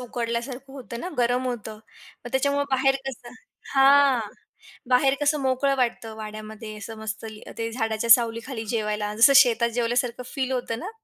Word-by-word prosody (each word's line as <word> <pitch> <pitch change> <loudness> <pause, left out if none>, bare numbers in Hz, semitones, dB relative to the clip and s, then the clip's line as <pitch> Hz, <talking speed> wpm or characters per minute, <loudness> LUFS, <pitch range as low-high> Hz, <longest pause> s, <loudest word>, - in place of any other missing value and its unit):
उकडल्यासारखं 245 +2 -4
होतं 245 -3 -8
ना, 360 - -4
गरम 245 +1 +1
होतं, 225 -3 -4 0.5
मग 245 - -7
त्याच्यामुळं 280 +2 +1
बाहेर 270 0 +3
कसं 245 -2 -7 0.4
हां. 275 -1 +5 0.7
बाहेर 270 +2 +4
कसं 290 0 +1
मोकळं 270 +1 +1
वाटतं 235 -3 -2
वाड्यामध्ये, 215 0 -8
असं 220 +2 -8
मस्त 220 0 -6
अ, 220 -1 -9
ते 230 0 -2
झाडाच्या 225 -1 -2
सावलीखाली 230 +1 +3
जेवायला 210 -1 -2
जसं 250 +6 +7
शेतात 235 -1 +1
जेवल्यासारखं 240 +1 0
फील 265 -2 -1
होतं 245 -3 -2
ना, 365 - -6
240 Hz, 150 wpm, -24 LUFS, 225-265 Hz, 0.7 s, जसं